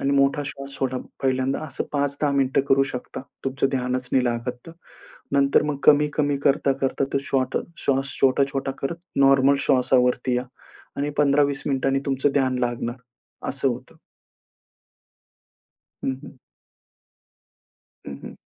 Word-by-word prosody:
आणि 140 - 0
मोठा 140 +1 +2
श्वास 140 0 -6
सोडा. 130 -1 -1 0.2
पहिल्यांदा 130 +1 0
असं 135 - -4
5-10 145 0 0
मिनिटे 135 -1 +2
करू 135 0 +5
शकता. 125 - -6 0.2
तुमचं 135 0 0
ध्यानच 125 -1 -2
नाही 130 -1 +3
लागत 120 +1 -2
तर. 165 - -9 0.6
नंतर 140 0 +4
मग 145 - -4
कमी-कमी 150 -1 +4
करता-करता 135 -1 +1
तो 140 - +2
शॉट 130 -1 0 0.2
श्वास 135 0 0
छोटा-छोटा 135 0 +2
करत 165 +5 -2 0.2
नॉर्मल 135 0 +5
श्वासावरती 125 -1 +2
या 125 - -1 0.5
आणि 145 +1 -1
15-20 140 -1 +3
मिनिटांनी 135 -1 +1
तुमचं 135 +1 +1
ध्यान 130 -2 +1
लागणार, 120 -1 -2 0.5
असं - - +1
होतं. - - -6 2.1
हं, - - +1
हं. 135 - -12 1.7
हं, 70 - -6
हं. - - -8
135 Hz, 125 wpm, -23 LUFS, 130-140 Hz, 2.1 s, करू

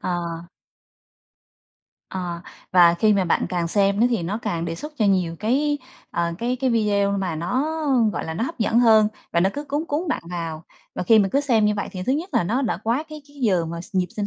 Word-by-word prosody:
Ờ. 180 -1 -1 1.9
Ờ, 175 -2 -4 0.3
và 175 -2 +7
khi 215 +5 +3
mà 195 -2 +2
bạn 170 - +1
càng 175 -2 -1
xem 200 +2 +2
nó 240 - +5
thì 225 -7 0
nó 195 +6 -2
càng 170 -1 -2
đề 165 - -3
xuất 300 - -8
cho 220 - +2
nhiều 185 -4 +1
cái, 285 +6 +1 0.3
ờ, 170 0 -1
cái 245 +3 -1
cái 260 - +2
video 205 -3 +2
mà 180 -4 -2
nó, 180 - -1 0.5
gọi - - -3
là, 160 - -5
nó 225 - -1
hấp 330 - -6
dẫn 230 +1 +2
hơn 220 -3 +6 0.2
và 170 - +3
nó 190 +2 +3
cứ 290 - -5
cuốn 295 +2 -2
cuốn 315 +4 -1
bạn - - -1
vào. 165 -2 -4 0.3
Và - - -3
khi 220 +5 +5
mà 195 -2 +3
cứ 280 - +3
xem 240 -7 +2
như 210 0 +2
vậy 205 - -3
thì 185 - -5
thứ 260 - +2
nhất 320 +6 -2
là 225 - +3
nó 245 +10 0
đã 230 - 0
quá 225 +4 0
cái 305 -1 -9
cái 290 - -19
giờ 185 -7 +2
mà 170 +1 -5
s 180 - -13
nhịp 185 -1 +2
sinh 205 -1 -1
205 Hz, 240 wpm, -23 LUFS, 175-245 Hz, 1.9 s, và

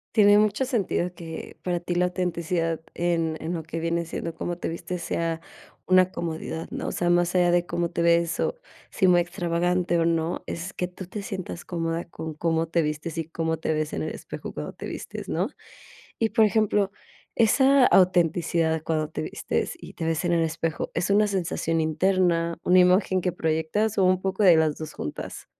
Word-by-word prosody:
Tiene 205 -1 +7
mucho 215 +5 +2
sentido, 200 -7 -1
que 165 -2 -8
para 175 -1 -1
ti 175 +1 -3
la 180 +1 +2
autenticidad 170 -2 -1
en 165 -2 0
en 165 +3 -3
lo 165 - -2
que 165 +1 -5
viene 170 +1 -1
siendo, 165 0 -5
cómo 175 +1 -4
te - - -4
vistes 170 +1 -5
sea 165 -1 -1 0.5
una 185 0 +4
comodidad, 160 -1 -4
¿no? - - -4
O - - -2
sea, 175 - 0
más 175 +1 +2
allá 175 -1 +4
de 175 0 +2
cómo 170 0 -1
te - - -2
ves, 170 0 +2
o - - 0 0.3
si 190 - +2
muy 175 -1 +6
extravagante 175 0 0
o 165 - +2
no, 165 0 0
es 175 +3 -5
que 180 - -2
tú 185 +1 -9
te 200 +4 -6
sientas 185 -3 -6
cómoda, 165 -1 -2
con 160 -1 -7
cómo 165 +1 0
te 170 +1 +1
vistes, 155 +1 -3
y 165 - -2
cómo 160 0 -1
te 160 - -2
ves 155 0 -2
en - - -2
el - - -2
espejo - - -7
cuando - - -6
te - - -7
vistes, - - -7
¿no? - - 0 0.7
Y, 225 - +2
por 220 0 +4
ejemplo, 210 -1 +2 0.4
esa 265 +4 +5
autenticidad 170 -3 +3
cuando 155 -2 -1
te - - -4
vistes, - - -2
y - - -11
te 165 - -5
ves 165 +1 0
en 175 - +2
el 165 -1 +3
espejo, 160 0 -2
¿es 170 +3 0
una 210 +1 +4
sensación 170 -4 -1
interna, 170 +1 +1
una 185 +1 +5
imagen 185 +1 +4
que 180 - 0
proyectas, 160 +8 0
o 190 - +5
un 185 0 +3
poco 190 +2 -1
de 175 -4 +7
las 155 -2 +2
2 155 -1 -7
juntas? 75 - -6
170 Hz, 200 wpm, -25 LUFS, 165-185 Hz, 0.7 s, Tiene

